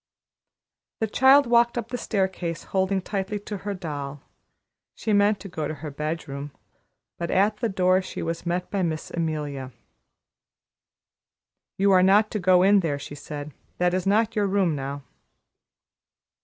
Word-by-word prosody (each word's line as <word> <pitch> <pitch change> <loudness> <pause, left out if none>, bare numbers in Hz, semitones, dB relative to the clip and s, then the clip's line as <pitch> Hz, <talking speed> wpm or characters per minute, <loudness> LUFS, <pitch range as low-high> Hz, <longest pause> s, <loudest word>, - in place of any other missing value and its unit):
The 220 - +1
child 265 +6 +5
walked 235 0 +3
up 235 -1 -3
the 245 - -3
staircase, 185 -5 -2
holding 190 0 0
tightly 200 +1 -3
to 205 0 -5
her 200 +1 -4
doll; 145 -5 -6 0.7
she 220 - -1
meant 205 0 +3
to - - -7
go 155 -5 -4
to 155 - -4
her 150 0 -7
bedroom, 145 -1 -4 0.7
but 170 -1 -3
at 205 +3 +2
the 230 +1 -1
door 185 -1 +3
she 185 - -6
was 165 0 -3
met 175 +1 -2
by 200 - 0
Miss 160 -3 -2
Amelia. 150 -5 -3 2.1
"You 195 +1 +3
are 185 -1 +6
not 205 +3 +4
to 210 - -2
go 180 -1 +4
in 200 +1 +6
there," 160 -6 -1
she 140 - -8
said. 145 0 -7 0.2
"That 180 0 +2
is 185 +1 -1
not 220 +3 +2
your 205 -2 +2
room 190 -5 +1
now." 140 0 -5
185 Hz, 155 wpm, -25 LUFS, 155-205 Hz, 2.1 s, are